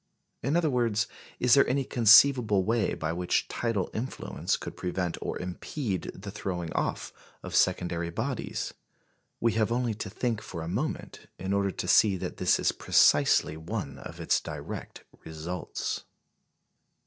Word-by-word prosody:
In 140 +7 +1
other 170 -2 +2
words, 115 -4 +1 0.3
is 125 -1 +4
there 140 - +6
any 135 +2 +1
conceivable 115 -3 +6
way 110 0 +1
by 80 +1 -2
which 90 +1 0
tidal 115 -5 -2
influence 125 +4 -2
could - - -7
prevent 90 -1 -2
or - - -3
impede 95 +4 -4
the 100 +1 -8
throwingoff 90 -5 -3 0.3
of - - -7
secondary 90 -2 +1
bodies? 85 - -3 0.7
We 115 - +2
have 110 +1 +1
only 120 -1 0
to 105 0 -5
think 115 +1 -2
for 85 -6 -6
a - - -5
moment 120 - -4
in 95 +2 -3
order 100 0 +2
to 90 - -5
see 95 +1 +5
that - - -5
this - - +3
is - - +2
precisely 75 +1 +4
one 80 -5 -5
of - - -9
its - - +1
direct - - -7 0.2
results. 80 +3 -4
100 Hz, 150 wpm, -28 LUFS, 90-115 Hz, 0.7 s, there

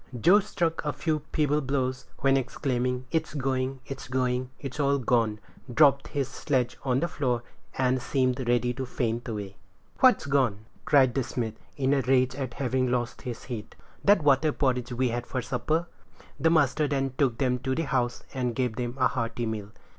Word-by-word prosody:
Joe 185 - +6
struck 170 -5 -1
a 150 -1 -1
few 155 -2 -1
feeble 150 -1 +2
blows, 130 -1 -2
when 135 0 +4
exclaiming, 125 -1 -1
"It's 160 -1 -1
going! 130 -1 -1
it's 135 -2 -7
going! 125 0 0
it's 135 +1 -7
all 140 -1 +3
gone!" 115 -4 +1 0.3
dropped 140 +1 +4
his 140 -3 -2
sledge 130 -3 -1
on 130 0 +1
the 170 - +1
floor, 125 -7 -1 0.3
and 130 0 +2
seemed 130 -1 0
ready 120 0 +2
to 130 +1 -4
faint 120 -1 -2
away. 100 -3 -5 0.4
"What's 255 -8 +5
gone?" 130 -7 +1 0.2
cried 130 -4 +5
the 135 - +1
smith, 115 -2 -3 0.2
in 135 0 +2
a 140 - +3
rage 130 0 +3
at 130 -3 -5
having 130 -1 0
lost 120 -1 -1
his 125 -3 -6
heat. 115 -5 -7 0.3
"That 200 -5 +5
water 145 +2 +4
porridge 125 -3 0
we 125 +1 +1
had 120 +1 -3
for 130 - -2
supper." 155 +6 -1 0.5
The 165 - +4
master 150 -2 +3
then 135 -2 -1
took 130 -6 +2
them 125 -1 +1
to 130 +1 -1
the 165 - 0
house, 125 -4 -1
and 125 -3 -1
gave 125 -3 -1
them 120 +1 -3
a 130 - +5
hearty 120 -1 -2
meal. 105 -2 -4
130 Hz, 185 wpm, -27 LUFS, 125-140 Hz, 0.5 s, Joe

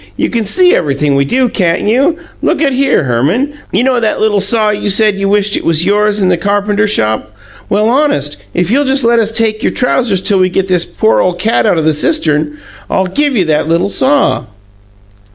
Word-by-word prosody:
You - - -1
can 230 -4 -2
see 360 - +3
everything 145 -1 -1
we 140 0 +1
do, 255 - +1
can't 180 -7 -1
you? 275 +10 +1 0.2
Look - - 0
at 285 -3 +1
here, 270 - +1
Herman: 150 - -1 0.2
you 200 +6 +1
know 255 -1 +1
that 220 -2 -1
little 215 -2 +1
saw 210 +2 +2
you 205 0 -3
said 210 +2 +3
you 195 0 -2
wished 205 0 +1
it - - -3
was 165 0 +2
yours, 210 +1 +1
in 190 - +1
the 180 - +1
carpenter 205 +2 0
shop? 110 - -1 0.4
Well, 210 +2 +1
honest, 235 - 0
if 180 +2 0
you'll 280 +4 +2
just 270 0 +1
let 235 0 +3
us 220 -1 0
take 225 -1 0
your - - 0
trousers 240 -6 0
till 200 -3 +2
we 185 0 +2
get 190 +1 -2
this 180 -2 +1
poor 220 - 0
ole 180 -1 0
cat 220 +4 0
out 205 - +2
the 155 0 +2
cistern, 150 - -1 0.3
I'll 190 - 0
give 280 +9 -1
you 185 - +1
that 155 -1 0
little 170 +4 0
saw." 280 +6 +1
205 Hz, 210 wpm, -11 LUFS, 175-235 Hz, 0.4 s, see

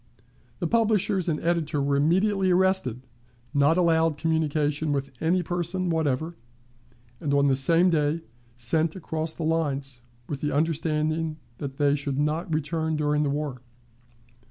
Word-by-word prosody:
The - - -3
publishers 205 -3 +2
and 150 - 0
editor 165 -3 0
were 140 0 +1
immediately 190 +6 +2
arrested, 180 - +2 0.5
not 145 +3 +3
allowed 165 -3 +3
communication 155 -1 0
with 140 -1 -2
any 175 +3 +2
person 175 +1 -2
whatever, 160 +1 -1 0.8
and 145 -3 0
on 140 0 +4
the 135 - +3
same 170 +7 +3
day 155 0 +1 0.4
sent 155 +7 0
across 160 -3 -3
the 165 - -5
lines, 140 -6 -1 0.3
with 140 -2 -5
the 150 - -1
understanding 155 0 0 0.2
that 135 -2 -6
they 145 -1 +3
should 140 -2 -2
not 155 +4 -1
return 160 +1 -1
during 150 -1 +1
the 145 - +1
war. 140 -3 -3
155 Hz, 140 wpm, -26 LUFS, 145-170 Hz, 0.8 s, on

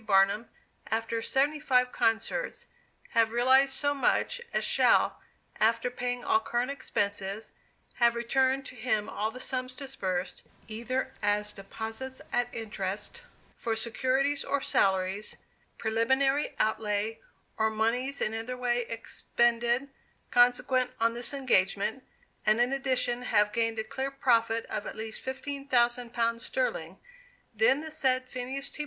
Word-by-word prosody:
Barnum, 200 +2 +3 0.4
after 225 +1 -1
seventy 285 +5 +1
five 250 -3 +2
concerts, 230 - 0 0.4
have 225 -1 +3
realized 260 +3 +4
so 285 -1 +1
much 475 - +1
as - - 0
shall, - - +3 0.4
after 230 +3 +2
paying 245 0 -3
all 220 - +3
current 240 +4 -1
expenses, 205 -5 -2 0.5
have 235 -1 +4
returned 260 +3 +1
to - - -9
him 220 -3 0
all 215 +1 -2
the 250 +3 -9
sums 255 0 -3
disbursed, 195 -11 -3 0.3
either 235 +4 -3
as 210 0 +1
deposits 225 +6 -7
at 245 0 +2
interest, 210 - -5 0.3
for 230 -1 -2
securities 260 +5 +1
of 280 -1 -1
salaries, 190 +1 +1 0.4
preliminary 265 +6 +1
outlay, 215 0 0 0.4
or 220 0 +2
moneys 235 +5 0
in 215 - 0
any 225 +3 -4
way 245 -1 0
expended 235 +2 0 0.4
consequent 250 +1 +3
on 230 0 +3
this 240 +1 0
engagement, 255 -3 +1 0.4
and 215 +2 +3
in 245 +2 +2
addition, 255 -3 0
have 210 -4 +2
gained 225 -1 0
a 220 - -1
clear 265 +4 -3
profit 230 -4 +2
of 210 - -4
at - - -6
least 220 0 -6
fifteen 275 +1 -5
thousand 240 -2 +2
pounds 230 -1 0
sterling, - - -2 0.6
then 485 - +3
the 315 0 -7
said 260 -4 +1
Phineas 260 +3 -4
T. - - -9
240 Hz, 135 wpm, -29 LUFS, 220-265 Hz, 0.6 s, realized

